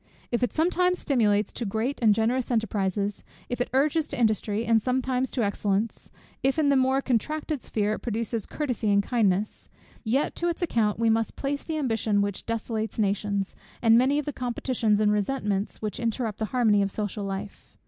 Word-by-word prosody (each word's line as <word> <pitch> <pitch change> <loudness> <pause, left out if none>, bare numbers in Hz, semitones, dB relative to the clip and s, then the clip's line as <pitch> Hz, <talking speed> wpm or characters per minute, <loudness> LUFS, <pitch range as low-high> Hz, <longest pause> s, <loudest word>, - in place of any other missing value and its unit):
If 240 - 0
it 245 - +1
sometimes 360 +2 +2
stimulates 215 -9 +1
to - - -4
great 225 +7 -2
and 215 -3 +5
generous 235 +3 0
enterprises, 205 -3 -1 0.3
if 245 0 -2
it - - -1
urges 295 +4 +2
to - - -5
industry, 215 -1 +1
and 225 -1 +3
sometimes 255 +1 0
to 245 - -1
excellence, 205 +1 -1 0.3
if 270 +3 +1
in 300 -2 +3
the 280 - +4
more 265 +1 +2
contracted 295 +4 -1
sphere 210 -1 -1
it - - -4
produces 230 -1 -3
courtesy 250 -8 -2
and 200 0 +4
kindness; 210 -3 0 0.3
yet 255 +5 +1
to 345 - +1
its 340 +1 -3
account 220 -10 +1
we 230 0 +3
must 225 0 0
place 280 +1 -2
the 320 -1 -3
ambition 225 -7 +1
which 200 -1 -4
desolates 225 -1 -3
nations, 200 -1 0 0.2
and 225 -1 +5
many 260 +4 +4
of 295 - -1
the 295 - -3
competitions 240 -4 0
and 210 -1 +3
resentments 210 -1 -1
which 215 +3 -3
interrupt 230 -2 -2
the 220 - 0
harmony 215 -3 +3
of 200 - +1
social 205 0 -3
life. 195 +1 -6
225 Hz, 185 wpm, -26 LUFS, 210-260 Hz, 0.3 s, and